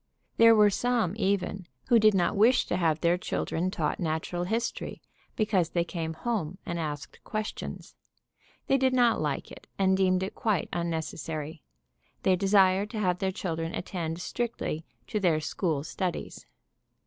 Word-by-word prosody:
There 230 0 +8
were 210 -1 +6
some, 235 -4 +1
even, 195 -3 -1 0.2
who 235 -2 +6
did 215 -1 +5
not 180 -2 +2
wish 225 +6 +4
to - - -1
have 165 -3 +1
their 175 +1 +3
children 180 0 -1
taught 160 -5 -2
natural 170 +1 -2
history, 230 +5 -2 0.4
because 200 -6 +1
they 170 -1 +1
came 165 -2 -4
home 185 -4 -2
and 170 -1 -3
asked 150 -3 -5
questions. 215 0 -5 0.7
They 270 - +3
did 260 0 +3
not 240 -6 +3
like 150 -2 -2
it - - -12
and 190 -1 +3
deemed 185 -1 +2
it 190 - -4
quite 210 -7 0
unnecessary. 160 -2 -3 0.6
They 190 - +4
desired 195 +1 +3
to 220 - -4
have 180 -3 +1
their 190 -1 0
children 165 -3 -3
attend 170 -2 -4
strictly 225 -8 -3 0.2
to 210 - -2
their 170 -5 +2
"school 155 -2 -1
studies." 180 +2 -4
185 Hz, 155 wpm, -28 LUFS, 165-210 Hz, 0.7 s, There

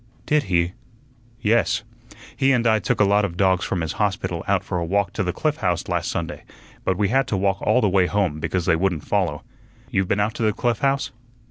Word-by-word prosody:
"Did 150 -3 +2
he?" 85 -2 +1 0.7
"Yes. 115 +2 +2 0.5
He 135 -1 +3
and 120 -2 +1
I 110 -1 +4
took 95 - -1
a - - +6
lot 100 +1 +3
of 85 -4 -3
dogs 95 -1 +2
from 90 - -2
his 80 - -2
hospital 90 -4 -1
out 100 -2 +2
for 90 -2 -3
a - - -1
walk 100 +2 0
to 110 - -2
the 90 -2 0
Cliff 150 - -1
House 90 - -1
last 85 -1 -1
Sunday, 85 -1 -4 0.4
but 95 - 0
we 100 -1 +1
had 135 +2 +2
to 100 - -1
walk 95 0 0
all 125 - +3
the 105 - +3
way 95 -1 +3
home, 95 -7 0
because 90 +3 -1
they 90 -2 +3
wouldn't 90 -3 -1
follow. - - 0 0.5
You've 95 -1 +1
been 100 - +1
out 105 +2 +1
to - - -6
the 110 -1 +2
Cliff 120 0 0
House?" 140 0 0
100 Hz, 230 wpm, -23 LUFS, 90-110 Hz, 0.7 s, a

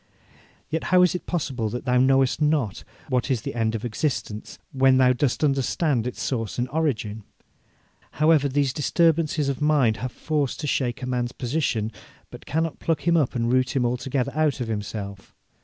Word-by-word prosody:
'Yet 160 +1 -2
how 180 0 +5
is 180 - +3
it 180 - -5
possible 130 -10 -2
that 120 +4 -5
thou 125 -1 +3
knowest 135 +2 +3
not 150 -9 +1 0.3
what 125 +1 0
is 125 -5 0
the - - -4
end 115 -1 0
of 110 - -4
existence, 115 -3 -3
when 135 -2 +4
thou 130 -1 +5
dost 135 +2 0
understand 135 - +1
its 125 - -6
source 115 -8 -2
and 125 - 0
origin? 115 -8 -2 0.9
However, 150 -2 +3
these 135 -1 +1
disturbances 155 -1 +2
of 140 0 -2
mind 145 -7 +3
have 125 +3 -4
force 150 -2 -2
to 150 - -5
shake 130 -3 -1
a - - -1
man's 125 -1 -2
position, 120 -5 -1 0.4
but - - -12
cannot 160 +1 -1
pluck 165 -2 -1
him 170 - +4
up 145 -5 +1
and 120 0 0
root 130 0 +1
him 125 -2 +2
altogether 125 +2 -1
out 155 -3 +1
of 120 - -3
himself. 105 -2 -5
130 Hz, 180 wpm, -24 LUFS, 120-150 Hz, 0.9 s, how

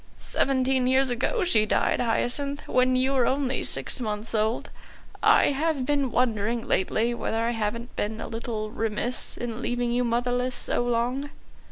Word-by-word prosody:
"Seventeen 260 -1 +1
years 260 0 +3
ago 260 - 0
she 230 -12 +3
died, - - +1
Hyacinth, 280 +4 -1
when 255 0 +3
you 260 +2 +2
were 255 -3 +3
only 265 -1 0
six - - 0
months 215 -1 -4
old. 220 +1 0 0.5
I - - +5
have 290 -1 0
been 280 -3 0
wondering 230 -1 0
lately 225 +5 +1
whether 225 -1 -2
I 235 - +1
haven't 230 +1 -3
been 215 +2 -2
a - - -5
little 225 -2 -4
remiss 225 +3 -1
in 240 0 -5
leaving 245 -1 -1
you 245 +1 +1
motherless 245 +1 0
so 240 - 0
long." 245 +4 -1
245 Hz, 160 wpm, -26 LUFS, 230-260 Hz, 0.5 s, I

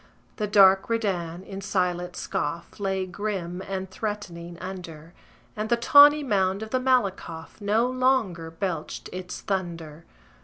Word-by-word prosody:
The 210 - -1
dark 195 -1 +6
Redan, 185 -6 -1
in 195 0 -7
silent 180 -2 -1
scoff, 165 +7 -4
Lay, 190 -1 -1
grim 185 -2 -4
and 190 -1 -3
threatening, 180 -5 -5
under; 170 -3 -8 0.4
And 215 +1 -3
the 235 - +3
tawny 290 +5 +7
mound 195 -4 +1
of 220 - -8
the 255 - +2
Malakoff 200 -9 -1
No 210 +3 +2
longer 255 -10 +1
belched 165 -2 -4
its 180 0 -6
thunder. 170 -5 -4
190 Hz, 130 wpm, -26 LUFS, 175-215 Hz, 0.4 s, tawny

